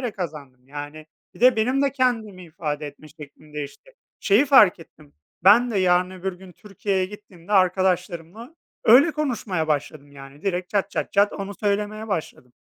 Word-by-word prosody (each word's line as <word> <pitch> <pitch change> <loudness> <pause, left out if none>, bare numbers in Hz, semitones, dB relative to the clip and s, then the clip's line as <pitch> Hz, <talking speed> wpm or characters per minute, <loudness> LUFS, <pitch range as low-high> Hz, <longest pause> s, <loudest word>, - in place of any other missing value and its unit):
kazandım 140 -8 -8
yani. 145 +2 -8 0.3
Bir - - -17
de 250 0 +5
benim 255 +5 +1
de 280 - +1
kendimi 225 -8 -1
ifade 150 -2 -5
etme 155 +2 -14
şeklim 150 0 -15
değişti. 150 - -8 0.3
Şeyi 215 +8 +3
fark 215 -10 +6
ettim: 155 -2 -17 0.3
Ben 235 +5 +6
de 210 - -1
yarın 180 -1 +2
öbür 185 0 -5
gün 180 0 -14
Türkiye'ye 195 -1 -3
gittiğimde 200 -2 -13
arkadaşlarımla 185 - 0 0.3
öyle 265 +8 +6
konuşmaya 235 - -2
başladım. 145 -1 -3
Yani 140 +1 -13
direkt 185 -2 -2
çat 200 -1 -1
çat - - -4
çat 205 +1 +3
onu 200 0 -6
söylemeye 210 +2 -2
başladım. 155 - -5
185 Hz, 155 wpm, -23 LUFS, 155-210 Hz, 0.3 s, fark